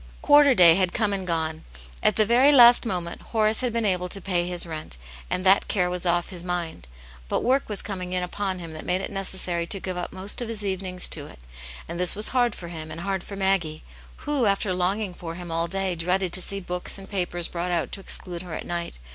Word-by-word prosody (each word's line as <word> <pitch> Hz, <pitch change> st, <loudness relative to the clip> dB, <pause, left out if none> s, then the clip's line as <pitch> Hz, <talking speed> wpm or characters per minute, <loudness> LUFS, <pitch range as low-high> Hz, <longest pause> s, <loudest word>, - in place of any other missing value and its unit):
Quarter 290 Hz, -2 st, +6 dB
day 170 Hz, -4 st, +9 dB
had 185 Hz, 0 st, +1 dB
come 210 Hz, -3 st, +1 dB
and 190 Hz, -2 st, -2 dB
gone. 160 Hz, -2 st, -2 dB, 0.4 s
At -, -, +3 dB
the 215 Hz, -, +3 dB
very 250 Hz, +6 st, +5 dB
last 240 Hz, -3 st, +7 dB
moment 175 Hz, -5 st, -4 dB
Horace 215 Hz, 0 st, +1 dB
had 250 Hz, -2 st, -1 dB
been 230 Hz, -1 st, -1 dB
able 180 Hz, -2 st, 0 dB
to 195 Hz, -, -2 dB
pay 175 Hz, -2 st, -1 dB
his 175 Hz, -1 st, -1 dB
rent, 155 Hz, -, -7 dB, 0.3 s
and 185 Hz, -, -2 dB
that 190 Hz, +1 st, +5 dB
care 180 Hz, -3 st, 0 dB
was 180 Hz, 0 st, -1 dB
off 175 Hz, 0 st, +1 dB
his 175 Hz, -2 st, -7 dB
mind. 175 Hz, -, -4 dB, 0.4 s
But -, -, -1 dB
work 265 Hz, +1 st, +1 dB
was 205 Hz, -2 st, 0 dB
coming 185 Hz, -3 st, -4 dB
in 180 Hz, 0 st, 0 dB
upon 190 Hz, +1 st, -3 dB
him 165 Hz, -2 st, -7 dB
that 155 Hz, -, -8 dB
made 180 Hz, +1 st, 0 dB
it -, -, -6 dB
necessary 185 Hz, -3 st, 0 dB
to 195 Hz, -, -3 dB
give 185 Hz, -1 st, -5 dB
up 175 Hz, -, -4 dB
most 190 Hz, +5 st, -4 dB
of 235 Hz, -, -4 dB
his 215 Hz, -2 st, -4 dB
evenings 185 Hz, -2 st, -1 dB
to 145 Hz, -2 st, 0 dB
it, -, -, -14 dB, 0.5 s
and 170 Hz, +1 st, -6 dB
this 180 Hz, -1 st, +3 dB
was 210 Hz, +1 st, +3 dB
hard 245 Hz, -3 st, +1 dB
for 170 Hz, -, -9 dB
him 160 Hz, -2 st, -7 dB
and 160 Hz, +2 st, -7 dB
hard 195 Hz, -1 st, -2 dB
for 200 Hz, -, -8 dB
Maggie, 190 Hz, -5 st, 0 dB, 0.4 s
who, 290 Hz, -6 st, +1 dB
after 195 Hz, -1 st, +1 dB
longing 185 Hz, +2 st, -1 dB
for 170 Hz, -1 st, -8 dB
him 175 Hz, -1 st, -7 dB
all 165 Hz, +1 st, -1 dB
day, 195 Hz, +1 st, -1 dB
dreaded 180 Hz, +2 st, -1 dB
to 185 Hz, -, +1 dB
see 200 Hz, +2 st, -2 dB
books 180 Hz, 0 st, -4 dB
and 195 Hz, 0 st, -10 dB
papers 175 Hz, -3 st, -2 dB
brought 175 Hz, +1 st, -4 dB
out 175 Hz, -2 st, -1 dB
to -, -, -5 dB
exclude 180 Hz, -2 st, -2 dB
her 175 Hz, -3 st, -7 dB
at -, -, -6 dB
night. 170 Hz, -, -4 dB
185 Hz, 240 wpm, -24 LUFS, 175-200 Hz, 0.5 s, day